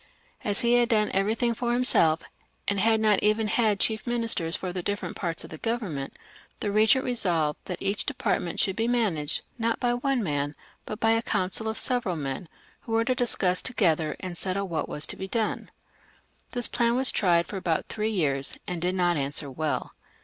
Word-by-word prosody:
As 205 -1 +1
he 235 0 +2
had 240 0 +2
done 215 -3 +2
every 195 +3 +1
thing 235 0 +1
for 240 +1 -1
himself, 170 -10 +3 0.4
and 200 -1 +1
had 220 +2 +3
not 215 -2 +3
even 215 +1 +2
had 215 -2 +2
chief 220 +2 +1
ministers 230 -9 +2
for 180 -2 -4
the 180 - -3
different 205 +3 -3
parts 170 -3 -3
of - - -11
the 155 - -8
Government, 200 - -3 0.4
the 205 - -2
regent 220 +5 +4
resolved 170 -11 0
that 180 -2 -5
each 200 +1 -1
different 290 - 0
part 170 - -4
should 190 -3 +2
be 225 +1 0
managed 205 -12 +1 0.2
not 230 0 0
by 245 -1 +1
one 250 0 0
man, 145 -3 -2 0.3
but 215 - -5
by 225 0 +3
a 225 0 +3
coimcil 195 +1 -1
of 220 - -2
several 245 -8 -1
men, 145 +2 -5 0.3
who 225 - -7
were 225 0 +2
to 255 - +2
discuss 215 -8 +3
to 260 - -2
gether 160 -7 +1
and 180 -2 -3
settle 195 +1 -1
whg 165 -3 -2
t - - -14
was 150 - +1
to - - +1
be 190 - -6
done. 220 +1 -2 0.8
This 245 -1 +3
plan 235 -1 +1
was 260 0 +4
tried 170 -4 +3
for 195 - -6
about 170 -4 -1
three 215 0 -2
years, 140 -10 +1
and 175 -2 -4
did 180 +2 0
not 175 -2 +2
answer 140 0 -2
well. 155 +2 -2
205 Hz, 210 wpm, -26 LUFS, 170-230 Hz, 0.8 s, regent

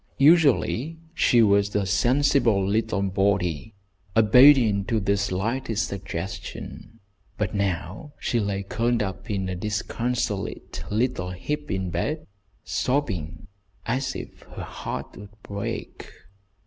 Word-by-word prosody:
Usually 150 0 +4 0.2
she 120 -8 +4
was 100 -1 +3
a 100 -1 +2
sensible 120 -2 +3
little 105 -1 0
body, 95 -3 0 0.4
obedient 115 -3 +6
to 115 0 +1
the 100 0 +1
slightest 105 +4 -1
suggestion, 100 +3 -7 0.4
but 105 -2 -1
now 100 - -2
she 120 - 0
lay 100 -2 -1
curled 115 +3 0
up 95 +4 -6
in 95 -2 -1
a 90 - -3
disconsolate 105 +1 -3
little 110 -4 0
heap 145 +12 -4
in 95 -2 -2
bed, 155 - -2 0.4
sobbing 95 - -2 0.4
as 130 +3 -1
if - - -8
her - - -5
heart - - -6
would 105 +1 -13
break. 100 0 -5
105 Hz, 115 wpm, -25 LUFS, 95-125 Hz, 0.4 s, obedient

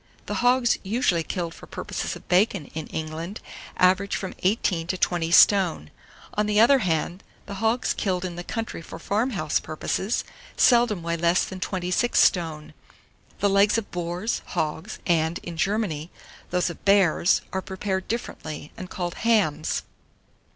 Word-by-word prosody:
The - - -4
hogs 245 0 +3
usually 195 -4 +1
killed 170 0 -4
for - - -13
purposes - - -4
of - - -13
bacon 180 -5 +2
in 160 -1 -5
England 160 +5 -5 0.4
average 190 +2 +3
from 190 - -4
18 185 -4 0
to 185 - -1
20 175 -2 0
stone; 170 - +5 0.4
on 210 0 0
the 210 0 +2
other 265 +5 +6
hand, 175 -1 -1 0.2
the 200 - -7
hogs 225 +2 +1
killed 185 -2 -1
in 175 -2 -5
the 175 - -6
country 225 -3 -4
for - - -9
farm 220 +6 0
house 160 - 0
purposes, 190 +7 -2 0.3
seldom 235 -7 +4
weigh 170 0 -1
less 170 +2 +2
than 190 - -7
26 185 +5 -1
stone. 160 -4 +2 0.7
The 205 - +3
legs 200 +2 +4
of 225 - -4
boars, 175 +5 -2
hogs, 160 +7 -3
and, 165 -1 +1
in 175 - -6
Germany, 180 -4 -1 0.4
those 180 -1 0
of 170 - -13
bears, 195 -3 +4
are 190 - -1
prepared 190 0 -3
differently, 155 -10 -5
and 185 - -8
called 175 -2 -3
hams. 215 -10 +1
185 Hz, 155 wpm, -25 LUFS, 170-210 Hz, 0.7 s, other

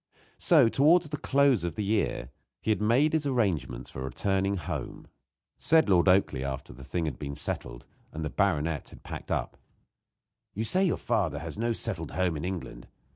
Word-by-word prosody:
So, 155 -9 +5
towards 155 +8 +4
the 150 - -2
close 140 -7 +3
of 85 -2 -3
the 105 - -2
year, 100 - -1 0.3
he 110 - 0
had 105 - 0
made 125 +9 +3
his 155 -2 +1
arrangements 90 - -1
for 65 - -7
returning 95 +8 0
home. 85 - -5 0.5
Said 160 -4 +4
Lord 90 -1 +4
Oakleigh, 90 -8 +3
after 65 -3 -5
the 65 +2 -12
thing 85 +5 -2
had 75 -5 -4
been 70 -1 -5
settled, - - -4 0.3
and 80 0 -5
the 75 - -3
baronet 80 -4 0
had - - -14
packed - - -8
up: - - -2 1.0
"You 110 - -1
say 185 - +2
you 175 - +2
have 85 -8 -2
no 120 +1 +1
settled - - -2
home 90 -3 0
in 75 - -5
England. 90 -10 -6
95 Hz, 180 wpm, -28 LUFS, 75-120 Hz, 1.0 s, So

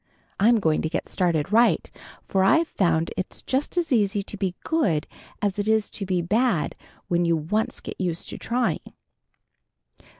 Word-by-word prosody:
I'm 225 +3 +5
going 160 -6 +2
to 160 - -1
get 165 - -3
started 170 -2 0
right, 235 +2 +3 0.4
for 190 -1 +2
I've 320 - +4
found 170 - +1
it's 185 - -5
just 270 +6 -1
as 335 -5 +1
easy 205 -3 +2
to 205 - -8
be 190 -3 -2
good 195 - +1 0.4
as 205 0 0
it 205 - -1
is 220 -1 +2
to 195 - -5
be 180 -2 0
bad 215 -1 +1 0.3
when 175 0 +1
you 170 -1 +3
once 210 +9 -1
get - - -7
used 175 -2 -2
to - - -7
trying." 245 +1 -1
195 Hz, 170 wpm, -25 LUFS, 175-225 Hz, 0.4 s, I'm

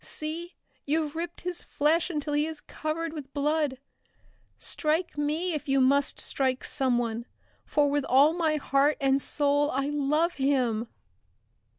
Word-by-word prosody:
See, 330 +3 -5 0.3
you've 305 +1 -1
ripped 340 +1 -5
his 355 0 -4
flesh 315 +4 +1
until 295 -3 -3
he 295 +1 +2
is 320 -2 -6
covered 315 +2 -4
with 285 -4 -8
blood! 295 -1 +1 0.8
Strike 320 +3 0
me 305 +5 -1
if 300 -1 -4
you 270 0 +3
must 275 +2 +3
strike 260 -2 -1
someone 240 -4 -1 0.4
for 295 -1 +2
with 285 0 0
all 280 +5 +5
my 325 -3 +1
heart 285 0 +2
and 275 0 +2
soul 290 0 +1
I 275 +1 -1
love 295 +4 +1
him!" 245 -5 +1
295 Hz, 145 wpm, -28 LUFS, 275-315 Hz, 0.8 s, all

